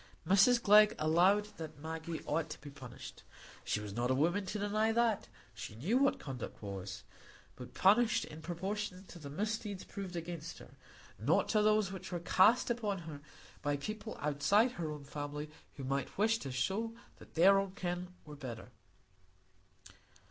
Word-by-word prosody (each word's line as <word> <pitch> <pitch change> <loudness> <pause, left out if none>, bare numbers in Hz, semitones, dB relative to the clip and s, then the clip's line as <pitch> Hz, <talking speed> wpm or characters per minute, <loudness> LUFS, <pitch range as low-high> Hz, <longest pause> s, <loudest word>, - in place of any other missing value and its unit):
Mrs 200 +6 +6
Glegg 210 -1 +7
allowed 180 +7 +4
that 160 -3 -7
Maggie 160 +2 -5
ought 160 +1 -1
to - - -7
be 145 0 -10
punished,—she 130 -5 -7
was 105 -1 -6
not 120 +3 0
a 130 - +3
woman 175 +8 +1
to 210 - -3
deny 210 +2 +1
that; 230 -2 +1 0.3
she - - -8
knew 190 - +1
what 275 0 +3
conduct 130 -4 -6
was,—but 100 +5 -9
punished 220 +4 +4
in 155 +1 -10
proportion 190 +3 -4
to 175 - -11
the 145 -3 -8
misdeeds 210 +4 -3
proved 195 -3 -7
against 170 -1 -5
her, - - -13 0.5
not - - +2
to 215 - +3
those 215 -2 +3
which 190 -1 -7
were 175 - -2
cast 205 +8 +4
upon 215 -4 -1
her 160 -5 -8 0.4
by 145 -1 0
people 215 +8 -5
outside 150 - +3
her 165 -8 -4
own 150 -1 -7
family 145 +1 -5 0.2
who 135 - -7
might 135 0 -2
wish 225 +3 +3
to 135 - -5
show 195 - -1 0.2
that - - -16
their 195 +4 +7
own 195 -1 -3
kin 180 -1 -3 0.2
were 150 -1 -9
better. 125 -5 -8
175 Hz, 160 wpm, -34 LUFS, 145-210 Hz, 0.5 s, Glegg